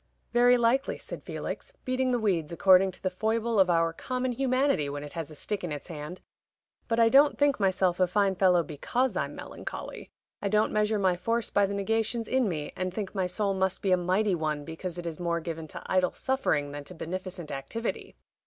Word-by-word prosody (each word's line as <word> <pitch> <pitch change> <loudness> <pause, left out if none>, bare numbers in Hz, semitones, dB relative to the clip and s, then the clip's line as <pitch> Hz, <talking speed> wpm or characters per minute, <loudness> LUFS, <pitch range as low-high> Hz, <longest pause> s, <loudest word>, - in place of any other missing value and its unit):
"Very 245 +1 +6
likely," 245 +4 +2
said - - -8
Felix, - - -6
beating 255 0 0
the 250 - +2
weeds, 180 -9 0
according 190 +2 +5
to - - -16
the 185 - 0
foible 220 +3 0
of 190 -1 +5
our 165 -1 +2
common 255 +7 -2
humanity 255 - +1
when 145 0 -5
it 145 - -9
has 165 -3 -5
a 155 - -11
stick 200 +6 -4
in 175 - -3
its 150 +4 -6
hand. 155 +2 -7 0.7
"But 230 0 +1
I 230 - +6
don't 280 +5 +5
think 285 -3 +3
myself 190 -2 +2
a 185 - +4
fine 195 +1 +2
fellow 180 -2 +4
because 240 - -1
I'm - - -2
melancholy. - - -7 0.3
I 200 - -1
don't 215 +1 +2
measure 215 0 +2
my 190 -3 +2
force 230 +5 -1
by 200 -1 +3
the 200 - -3
negations 225 +3 -1
in 255 -4 +2
me, 150 -4 -4
and 185 0 -2
think 195 0 -5
my 190 -3 0
soul 200 +2 0
must 190 -1 -1
be 195 - +1
a - - +7
mighty 185 +3 +1
one 155 -3 -2
because 170 +2 -6
it 175 - -6
is 165 -1 -5
more 170 -1 0
given 160 -1 -5
to - - -9
idle 185 -1 +1
suffering 205 - 0
than 145 0 -6
to 180 - -10
beneficent 180 0 -5
activity. 140 - -4
190 Hz, 210 wpm, -28 LUFS, 170-225 Hz, 0.7 s, a